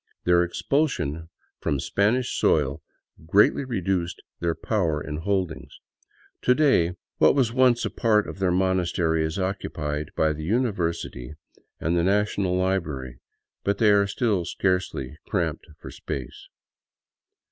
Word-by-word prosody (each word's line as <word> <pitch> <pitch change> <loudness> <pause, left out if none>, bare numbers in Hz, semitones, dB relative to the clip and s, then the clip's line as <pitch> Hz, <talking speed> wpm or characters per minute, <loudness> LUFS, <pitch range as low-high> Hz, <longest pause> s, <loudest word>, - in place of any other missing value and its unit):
Their 90 0 +4
expulsion 85 - -1 0.3
from 70 - -1
Spanish 110 - +1
soil 70 -3 +1 0.5
greatly 105 +9 +4
reduced 95 -8 -2 0.2
their 85 -1 0
power 85 -9 0
and 75 +1 -5
holdings. 90 -1 -3 0.6
To 125 - +4
day, 110 - +3 0.2
what - - +5
was 125 -5 +2
once 125 -2 +3
a - - -2
part 105 -3 +2
of - - -8
their 95 -1 +2
monastery 90 -3 +1
is 80 +2 -2
occupied 75 -6 -3
by 80 -1 +2
the 75 +1 -7
University 85 - -2 0.4
and 80 +2 0
the 85 - +3
National 100 -1 +1
Library, 75 -10 -2 0.4
but 100 0 0
they 105 -1 +4
are 100 -1 +4
still 100 -3 0
scarcely 90 -7 -2
cramped 85 -6 -2
for - - -10
space. 65 -3 -7
90 Hz, 130 wpm, -25 LUFS, 80-105 Hz, 0.6 s, what